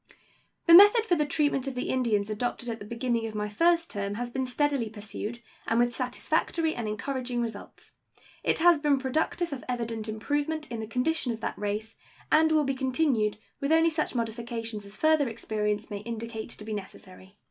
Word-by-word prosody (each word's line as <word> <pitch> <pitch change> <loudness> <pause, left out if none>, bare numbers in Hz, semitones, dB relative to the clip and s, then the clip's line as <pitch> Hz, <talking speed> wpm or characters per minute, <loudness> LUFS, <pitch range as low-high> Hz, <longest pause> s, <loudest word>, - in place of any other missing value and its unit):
The 335 - +6
method 415 +5 +9
for 370 - +1
the 300 -3 +2
treatment 290 -3 +1
of 270 - -3
the 250 - -3
Indians 220 -5 +1
adopted 240 +2 -3
at 225 -1 -4
the 205 - -8
beginning 235 0 -1
of 215 - -8
my 210 0 -1
first 335 +10 +2
term 200 0 -3
has 240 +2 -4
been 260 +1 -2
steadily 275 -2 0
pursued, 215 +2 -7 0.2
and 225 - +1
with 240 0 +3
satisfactory 315 +6 0
and 230 -2 -4
encouraging 245 +3 -3
results. 225 -3 -6 0.5
It - - +2
has 340 -1 +5
been 290 -2 +3
productive 310 +5 -1
of 265 - -6
evident 230 -3 -3
improvement 290 +7 -2
in 230 - -4
the 220 - -5
condition 250 +4 0
of 225 - -9
that - - -3
race, 210 +2 -4 0.3
and 315 +1 +5
will 310 -1 +4
be 270 - 0
continued, 260 -5 +1 0.2
with 280 +2 -1
only 325 +1 +5
such 310 -4 -1
modifications 230 -2 -4
as 200 - -9
further 310 -4 +3
experience 210 -1 -2
may 205 - -3
indicate 230 0 -6
to 210 - -7
be 220 - -4
necessary. 190 -1 -9
240 Hz, 190 wpm, -28 LUFS, 220-290 Hz, 0.5 s, method